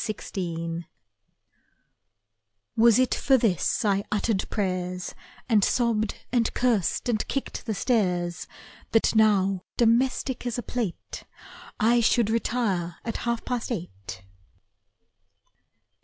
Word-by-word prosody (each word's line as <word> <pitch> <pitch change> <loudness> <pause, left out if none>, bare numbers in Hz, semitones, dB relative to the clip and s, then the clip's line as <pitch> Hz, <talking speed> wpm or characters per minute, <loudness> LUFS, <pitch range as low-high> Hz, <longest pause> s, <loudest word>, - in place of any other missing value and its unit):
Grown 170 -3 -3
up 170 - -11 1.9
Was 230 -1 +6
it 255 -1 +3
for 270 -1 +3
this 215 - +1
I 200 -1 +2
uttered 210 -1 0
prayers, 180 -2 -2 0.3
And 215 -4 +4
sobbed 225 -3 +1 0.2
and 235 -2 +2
cursed 235 -7 +1
and 225 -3 0
kicked 275 - -4
the 220 - -1
stairs, 180 -8 0 0.5
That 225 - +3
now, 195 -3 +3 0.2
domestic 245 +2 +1
as 240 - -2
a 245 - -3
plate, 230 -8 -4 0.5
I 235 +2 +4
should 225 -1 +3
retire 210 -7 -1
at 230 - -3
half 235 -1 -1
past 245 -1 -3
eight? 95 - -6
220 Hz, 110 wpm, -26 LUFS, 180-235 Hz, 1.9 s, Was